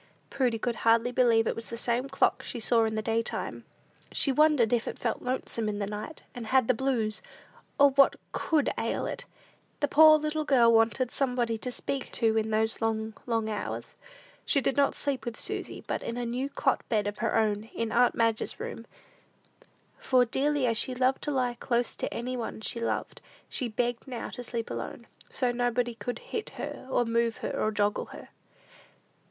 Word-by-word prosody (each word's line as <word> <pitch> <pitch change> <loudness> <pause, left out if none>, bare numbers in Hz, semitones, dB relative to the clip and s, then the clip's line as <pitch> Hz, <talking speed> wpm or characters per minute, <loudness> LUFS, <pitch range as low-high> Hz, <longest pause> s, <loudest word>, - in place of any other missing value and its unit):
Prudy 250 -4 +1
could 235 0 -2
hardly 230 +2 +3
believe 235 -2 +4
it - - +1
was 230 - -6
the 230 - -5
same 245 +3 0
clock 270 - +2
she 240 - -6
saw 230 0 +3
in 220 0 -2
the 215 - -2
daytime. 225 +1 -2 0.5
She 275 - 0
wondered 280 -5 +4
if 235 -1 +1
it - - -4
felt 230 - -2
lonesome 240 -3 -2
in 205 - -3
the 205 - -1
night, 210 +9 -7
and 240 -3 -7
had 260 -1 +3
the 255 - +4
blues; 225 -4 0 0.6
or 280 0 +7
what 275 0 +5 0.2
could 305 -4 +1
ail - - -1
it! - - -5 0.5
The 290 - +2
poor 310 +2 +8
little 305 0 -2
girl 240 -5 +5
wanted 230 +2 +3
somebody 245 -4 0
to 250 - -4
speak 270 +1 -4
to 225 -2 +2
in 220 0 +1
these 220 +1 0
long, 220 0 -1
long 225 -2 0
hours. 210 -1 -4 0.5
She 285 - +2
did 270 - 0
not 280 -1 +3
sleep 275 -4 -2
with 235 -2 -5
Susy, - - -5
but - - -2
in 235 - -4
a 245 - -2
new 250 +4 -2
cot 270 -1 +1
bed 215 -3 +1
of 205 0 -4
her - - 0
own, 215 -1 +1
in 225 -1 -4
aunt 245 +1 +4
Madge's 230 -1 0
room; 230 - -6 1.1
for, 255 -2 +3
dearly 280 +3 +1
as 230 -2 +2
she 255 - +1
loved 255 +1 +2
to 295 - -1
lie 250 -3 +1
close 240 0 -1
to - - -3
any 250 +2 -3
one 230 -2 -5
she 235 - -1
loved, 230 - -3 0.3
she 250 - -1
begged 240 +2 -2
now 250 -3 -5
to 250 - -6
sleep 235 -1 -4
alone, 120 - -5 0.2
"so 250 -2 0
nobody 245 0 0
could 230 +2 -5 0.2
hit 445 - -2
her, - - -6
or 245 - +2
move 230 0 +1
her, - - -1
or 215 - 0
joggle 205 -1 0
her." - - -11
240 Hz, 195 wpm, -28 LUFS, 225-260 Hz, 1.1 s, poor